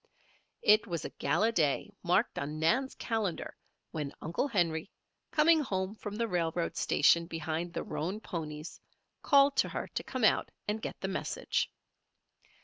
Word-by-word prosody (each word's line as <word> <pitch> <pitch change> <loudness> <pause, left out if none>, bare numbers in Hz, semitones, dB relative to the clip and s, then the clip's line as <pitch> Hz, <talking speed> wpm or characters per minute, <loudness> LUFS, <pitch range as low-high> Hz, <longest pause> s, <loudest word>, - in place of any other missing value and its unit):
It 215 +2 +5
was 170 -4 -3
a - - -5
gala 215 +11 +1
day 160 0 +1
marked 185 +6 +1
on 150 +2 -4
Nan's 240 +13 +2
calendar 220 -7 -2 0.4
when 150 -3 -4
Uncle 170 - -1
Henry, 170 - 0 0.4
coming 320 +1 +5
home 190 -8 -1
from 210 -1 -7
the 230 +1 0
railroad 170 -3 -1
station 170 +3 +4
behind 165 +1 -3
the - - -2
roan 185 +7 -3
ponies, 155 -6 -6 0.4
called 280 -1 +5
to - - +3
her - - -4
to - - -4
come 255 -3 -4
out 215 - +4 0.2
and 210 +1 -1
get - - -5
the 190 - -1
message. 190 - -1
185 Hz, 150 wpm, -31 LUFS, 160-225 Hz, 0.4 s, It